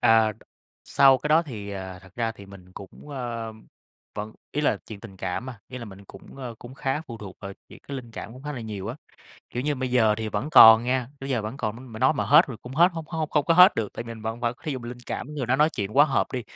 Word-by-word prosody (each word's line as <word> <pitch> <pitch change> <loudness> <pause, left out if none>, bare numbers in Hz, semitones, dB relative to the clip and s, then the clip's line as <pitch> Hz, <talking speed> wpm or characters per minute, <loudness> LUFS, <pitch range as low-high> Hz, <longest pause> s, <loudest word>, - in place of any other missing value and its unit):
À, 110 -1 +5 0.5
sau 135 -1 +5
cái 150 - -4
đó 160 +2 +5
thì, 105 -9 -7
à, 95 -2 -6
thật 95 0 -18
ra 115 -1 -1
thì 100 -3 -13
mình 95 -2 -14
cũng, 100 +10 -12
ờ, 120 -5 -5 0.6
vẫn 105 +1 -5 0.2
ý 150 - -1
là, 140 - +2
chuyện 105 -3 -9
tình 100 -4 -11
cảm 95 +7 -4
mà, 125 -4 -8
ý 130 - -7
là 120 - -7
mình 100 -1 -12
cũng, 95 +5 -14
ờ, 125 -3 -6
cũng 125 +2 -11
khá 135 +2 -2
phụ 115 -2 -8
thuộc 100 -3 -9
vào 100 -1 -7 0.2
chuyện - - -13
cái 140 - -4
linh 120 -3 -8
cảm 110 - -8
cũng 130 +3 -12
khá 150 0 -5
là 125 - -6
nhiều 105 -2 -6
á. 125 - -5 0.5
Kiểu 125 - -3
như, 145 0 0
bây 130 -1 -3
giờ 110 -4 +4
thì 110 -1 -3
vẫn 110 +9 -3
còn 115 -6 +9
nha, 125 -1 0
tới 135 0 -5
giờ 120 -4 0
vẫn 110 +5 -5
còn 110 -4 -3
nói, 130 +2 -11
m 120 - -13
mà 110 - -7
nói 130 +4 +4
mà - - -1
hết 150 +5 +6
rồi 125 -5 -7
cũng 125 +2 -9
hết 170 +3 +6
hông 165 -1 -6
hông 160 -2 -3
không 150 -2 +2
có 165 - +3
hết 180 +2 +8
được. 110 -3 -2
Tại - - -5
vì - - -11
mình 110 - -12
vẫn 115 +2 -4
vẫn 120 0 -1
thí 155 - -3
dụ 130 - -3
mình 120 -1 -8
linh 120 0 -8
cảm 150 +3 -5
người 135 -4 -3
đó 130 +2 +2
nói 150 +2 +4
chuyện 105 +4 -4
quá 145 - +8
hợp 140 -3 0
đi, 125 -2 -2
120 Hz, 295 wpm, -25 LUFS, 110-135 Hz, 0.6 s, còn